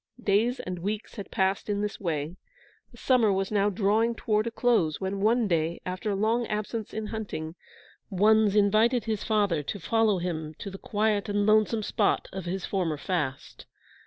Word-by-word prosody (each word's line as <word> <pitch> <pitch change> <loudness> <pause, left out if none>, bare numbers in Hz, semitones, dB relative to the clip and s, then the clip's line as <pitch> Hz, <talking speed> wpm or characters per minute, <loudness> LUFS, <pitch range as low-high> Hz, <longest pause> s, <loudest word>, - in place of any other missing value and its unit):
Days 220 +5 +2
and 180 -1 -5
weeks 205 +4 -4
had 200 - -7
passed 190 +2 0
in 205 0 0
this 210 -1 -3
way. 160 -3 -3 0.5
The - - -18
summer 245 -5 +3
was 195 +1 -1
now 205 -1 +2
drawing 215 +4 +1
toward 215 0 0
a - - +1
close, 225 -10 +1
when 195 +1 -3
one 225 +2 +3
day, 165 -1 0
after 185 +3 -3
a 200 - 0
long 225 +4 +1
absence 215 +1 -3
in 220 0 -4
hunting, 205 -8 -5 0.6
Wunzh 210 +1 +3
invited 215 +4 +3
his 215 -2 -2
father 205 -8 +1
to 175 +8 -5
follow 220 +3 +2
him 160 -3 -4
to 200 - -7
the 195 - -9
quiet 210 -1 0
and 205 0 +1
lonesome 215 +1 +3
spot - - 0
of 190 -2 -5
his 185 +1 -3
former 175 -6 -1
fast. 145 -6 -4
205 Hz, 180 wpm, -27 LUFS, 185-220 Hz, 0.6 s, summer